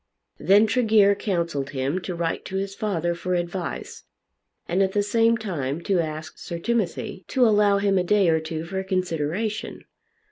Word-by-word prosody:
Then 205 +3 +5
Tregear 220 -3 +4
counselled 170 -9 -2
him 140 +8 -1
to 180 0 -5
write 170 -1 -2
to 190 - -6
his 195 0 -2
father 175 -5 -1
for 180 +1 -2
advice, 175 +1 -4 0.6
and 180 +3 +1
at 190 0 +1
the 205 - +2
same 230 +2 +3
time 160 -10 -3
to 185 +1 +1
ask 155 -1 -4
Sir 170 - -5
Timothy 195 -2 -2
to 255 -2 +3
allow 205 -2 +4
him 200 -1 +2
a - - +1
day 200 0 +3
or 160 -1 +3
two 160 0 -5
for 190 +3 -3
consideration. 185 +3 -2
190 Hz, 170 wpm, -24 LUFS, 170-205 Hz, 0.6 s, Then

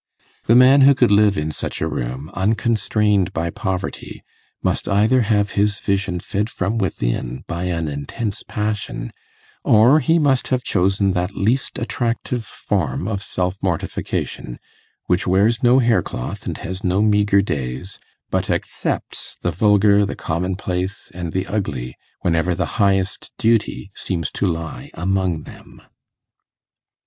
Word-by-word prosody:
The 115 - +5
man 130 +3 +7
who 140 +1 +7
could 125 -4 +3
live 105 -1 +4
in 75 +1 -1
such - - -5
a - - 0
room, 65 +5 -4
unconstrained 105 -2 +1
by 85 +1 -2
poverty, 95 -4 -4 0.4
must - - 0
either 110 +6 +4
have 105 -2 +1
his 100 0 +1
vision 95 -2 -1
fed 105 +5 -2
from 105 +4 -2
within 65 - -2
by 85 +2 -4
an 85 -3 -1
intense 75 +9 -4
passion, 105 - -3 0.5
or 120 +8 +6
he 165 +2 +3
must 140 -5 +2
have 130 -1 0
chosen 95 +1 +1
that 90 +2 -2
least 120 +6 0
attractive 120 0 -2
form 95 - -2
of 100 -3 -2
self 90 -1 -2
mortification 85 -8 -3 0.5
which 90 +1 +1
wears 105 +6 +3
no 125 0 +5
haircloth 115 - 0
and - - -3
has 95 +1 -6
no 95 +3 +2
meagre 105 -2 +3
days, 70 +2 -4 0.3
but - - 0
accepts - - -3
the - - +1
vulgar, 105 +1 +4
the 100 - -2
commonplace, 90 +3 -3
and 85 -2 -5
the 95 +2 -1
ugly, 70 - -3 0.3
whenever 85 +1 +1
the 90 +2 -2
highest 95 -2 +1
duty 110 -3 +1
seems 85 -5 -3
to 100 - -1
lie 85 -2 -4
among 90 -2 0
them. - - -14
100 Hz, 140 wpm, -20 LUFS, 90-110 Hz, 0.5 s, man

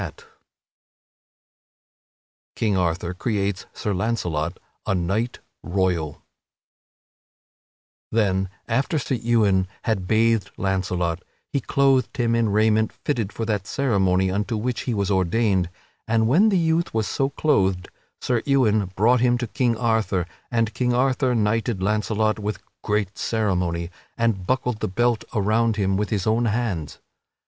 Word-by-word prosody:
[Sidenote: - - -7 2.3
King 105 -3 +1
Arthur 90 -1 0
creates 100 -1 -2
Sir 105 - -3
Launcelot 90 -5 -1 0.3
a 100 - +2
Knight 100 +7 -1 0.2
Royal] 90 -5 -1 1.9
Then, 95 -4 +1 0.2
after 135 +7 0
Sir 135 - -2
Ewain 105 -5 +2 0.2
had 100 -6 -1
bathed 110 -1 +2
Launcelot, 90 -3 -1 0.3
he 140 - +1
clothed 135 -1 +2
him 120 -2 +1
in 115 -2 +2
raiment 110 +1 +2
fitted 115 -9 -2
for 115 - -4
that 105 -3 -2
ceremony 95 -8 +1
unto 105 +3 -1
which 120 +3 -2
he 120 - 0
was 100 0 0
ordained, 95 0 +1 0.4
and 110 0 +2
when 180 - +5
the 195 - +2
youth 165 -4 +1
was 110 -1 +1
so 135 +5 0
clothed, 95 -13 +1 0.3
Sir 120 -3 0
Ewain 110 -7 +3
brought 120 +5 +4
him 120 -1 +3
to 120 - -2
King 120 0 0
Arthur, 110 -6 +1 0.2
and 115 -2 0
King 125 -1 0
Arthur 130 0 +2
knighted 115 0 0
Launcelot 110 +1 +1
with 105 -2 -3 0.2
great 105 -2 -1
ceremony, 90 -6 -1 0.3
and 110 -6 0
buckled 125 -3 0
the - - -1
belt 120 +4 +1
around 110 +2 +2
him 95 -2 +1
with 105 +1 -1
his 100 -4 -1
own 115 +2 +2
hands. 105 -9 -2
110 Hz, 135 wpm, -23 LUFS, 95-120 Hz, 2.3 s, when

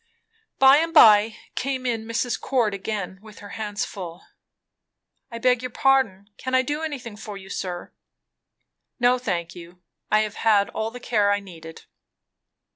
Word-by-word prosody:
By 270 +1 +7
and 330 +2 -1
by 215 -4 +7 0.2
came 260 -1 -3
in 230 -3 -2
Mrs. 235 +1 -2
Cord, 235 -6 +1
again 195 -2 -5
with 215 -1 -14
her 205 - -11
hands 210 0 -4
full. 180 -4 -8 1.1
"I 230 - -7
beg 250 0 +2
your 250 - -4
pardon 225 -7 +1
can 260 0 -2
I 260 - +4
do 295 +3 -3
anything 270 -8 -5
for 210 -1 -8
you, 190 0 -11
sir?" 180 -2 -5 1.1
"No, 250 +1 +3
thank 175 -8 -3
you. 175 0 -13 0.3
I 215 - +4
have 215 -1 -4
had 210 -3 +3
all 220 0 -3
the 245 +2 -10
care 210 -4 +1
I 205 - +1
needed." 165 -5 -12
220 Hz, 160 wpm, -24 LUFS, 200-250 Hz, 1.1 s, By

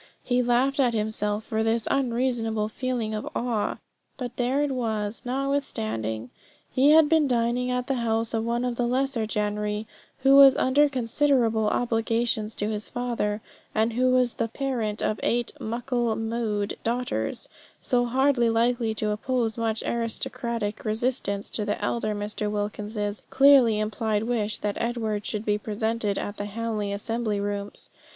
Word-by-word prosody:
He 250 0 +2
laughed 250 +3 +2
at 245 -4 +3
himself 210 -1 -1
for 220 0 -2
this 225 0 +1
unreasonable 235 -4 0
feeling 240 -2 -2
of 215 - -4
awe; 230 -4 -1 0.4
but 245 -1 -5
there 255 +4 +1
it 290 - 0
was 220 -4 -2
notwithstanding. 120 - -2 0.4
He 270 +3 +4
had 310 0 +7
been 310 -1 +3
dining 245 0 +1
at 250 0 -1
the 270 - 0
house 225 0 0
of 225 -1 0
one 235 +2 0
of 245 -1 -2
the 245 - +1
lesser 255 -2 0
gentry, 210 0 -1 0.4
who 270 0 +6
was 275 -1 +9
under 285 +3 +4
considerable 240 -3 +2
obligations 225 -1 0
to 205 - -2
his 215 0 -4
father, 235 -4 -2 0.3
and 220 +1 +2
who 255 +2 +2
was 255 -1 +3
the 230 - -1
parent 230 -4 -2
of 215 - 0
eight 240 0 0
"muckle 235 0 -1
mou'ed" 225 -2 -2
daughters, 245 +2 -2 0.3
so 245 -2 +1
hardly 255 -1 +3
likely 230 0 +1
to 215 0 -1
oppose 225 +1 -1
much 225 -1 -1
aristocratic 235 -1 -2
resistance 215 -2 -1
to 215 - -2
the 210 0 -2
elder 215 0 -1
Mr. 210 0 -3
Wilkins's 210 0 -3
clearly 270 -5 +6
implied 215 0 -1
wish 225 -3 -1
that 205 -1 -3
Edward 220 -3 -2
should 215 0 -3
be 210 0 +1
presented 215 -1 -1
at 205 - -4
the 205 - -3
Hamley 210 -1 -3
assembly 215 +1 -2
rooms. 205 0 -4
230 Hz, 155 wpm, -26 LUFS, 210-250 Hz, 0.4 s, was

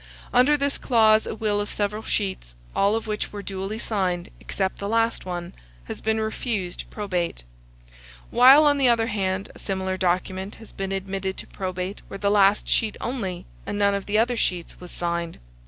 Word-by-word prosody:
Under 255 +4 +5
this 280 0 -1
clause, 220 -3 +4
a - - -3
will 210 -1 0
of 205 - -5
several 210 +1 -1
sheets, 190 - -3 0.2
all 200 +2 +3
of 225 - -2
which 215 -1 -3
were 205 -1 -6
duly 195 +2 -4
signed, 185 -6 -1
except 190 -1 -2
the 200 - -3
last 230 -1 +1
one, 175 -1 -4 0.3
has - - -7
been 220 0 +1
refused 220 -4 -3
probate; 180 - -2 0.9
while, 265 +5 +8
on 290 -1 +4
the 260 -2 +5
other 230 -1 +3
hand, 195 -3 -2
a - - -14
similar 190 -1 -2
document 185 +2 -1
has 225 - -13
been 195 0 -4
admitted 195 0 -3
to - - -5
probate 185 +1 -4
where 195 - -7
the 200 0 +1
last 205 0 +4
sheet 220 -2 +1
only, 225 -8 -3 0.2
and - - -2
none 200 -1 +3
of 200 -1 -3
the 210 +1 +1
other 240 +2 +3
sheets, 180 -6 -2
was 180 - -10
signed. 170 -1 -3
200 Hz, 185 wpm, -25 LUFS, 190-220 Hz, 0.9 s, while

